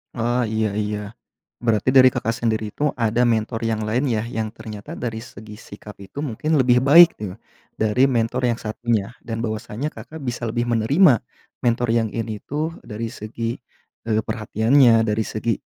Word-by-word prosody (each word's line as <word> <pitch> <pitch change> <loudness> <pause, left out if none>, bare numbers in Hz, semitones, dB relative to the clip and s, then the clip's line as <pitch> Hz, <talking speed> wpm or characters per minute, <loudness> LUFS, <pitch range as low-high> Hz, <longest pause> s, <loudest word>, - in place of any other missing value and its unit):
Ah, 120 0 0
iya 110 -1 0
iya, 105 0 -2 0.7
berarti 115 -1 +1
dari 130 -1 +8
Kakak 115 0 -2
sendiri 110 -3 -2
tuh 150 0 +1
ada 115 +1 +1
mentor 115 0 0
yang 110 -1 -1
lain 125 +6 0
ya, 110 0 -1
yang 110 -2 -3
ternyata 105 -2 -9
dari 115 -2 -4
segi 105 -2 -11
sikap 105 0 -12
itu 100 +8 -11
mungkin 150 +3 -1
lebih 125 -1 +4
baik 165 +5 +8
ya, 95 0 -6 0.4
dari 110 +3 +2
mentor 120 +1 0
yang 115 - -2
satunya, 110 0 -2
dan 115 -1 -5
bahwasanya 115 +5 -4
Kakak 160 - -10
bisa 125 -4 -5
lebih 120 +2 -1
menerima, 120 - +4 0.4
mentor 120 0 +1
yang 115 -2 +1
ini 110 -2 -4
tuh 155 +3 -3
dari 115 +1 -5
segi, 115 0 -5 0.5
eee, 110 0 +2
perhatiannya 115 +2 +3
dari 110 +1 0
segi 110 +2 -2
115 Hz, 165 wpm, -22 LUFS, 110-125 Hz, 0.7 s, dari